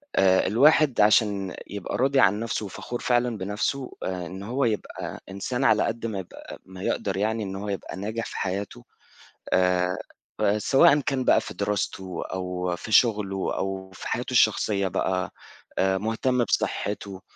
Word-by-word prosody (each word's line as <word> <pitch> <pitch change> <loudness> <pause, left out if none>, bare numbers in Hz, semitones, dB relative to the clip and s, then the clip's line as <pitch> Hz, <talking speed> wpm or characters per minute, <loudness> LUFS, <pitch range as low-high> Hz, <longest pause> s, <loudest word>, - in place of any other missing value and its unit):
آآ، 95 -1 +4
الواحد 140 +2 +4
عشان 105 -3 +3
يبقى 100 -3 -4
راضي 135 +2 +3
عن 100 -2 +4
نفسه 115 -1 -2
وفخور 120 +5 -6
فعلًا 120 -2 +1
بنفسه 105 +7 -2
آآ، 90 -1 -3
إنه 95 +3 -7
هو 130 +2 +1
يبقى 110 -3 -4
إنسان 110 +7 -3
على 110 -4 +4
قدر 115 0 -2
ما 100 -3 -3
يبقى 95 - -10
ما 95 0 -11
يقدر 95 -2 -1
يعني 110 +2 0
إن 95 -1 -5
هو 100 +2 -5
يبقى 100 -1 -5
ناجح 110 +3 -3
في - - -7
حياته، 95 -7 -4 0.7
آآ، 90 0 +2 0.6
سواءً 135 +6 +5
كان 135 -2 -1
بقى - - +5
في - - -7
دراسته 95 -3 -2
أو 90 -1 -2
في 110 - -8
شغله 105 -4 +2
أو 95 -1 -3
في - - -8
حياته - - -2
الشخصية 100 -2 +3
بقى، 95 +1 -1 0.5
آآ، 95 0 +2
مهتم 115 +4 0
بصحته، 100 -3 -2
100 Hz, 155 wpm, -25 LUFS, 95-115 Hz, 0.7 s, سواءً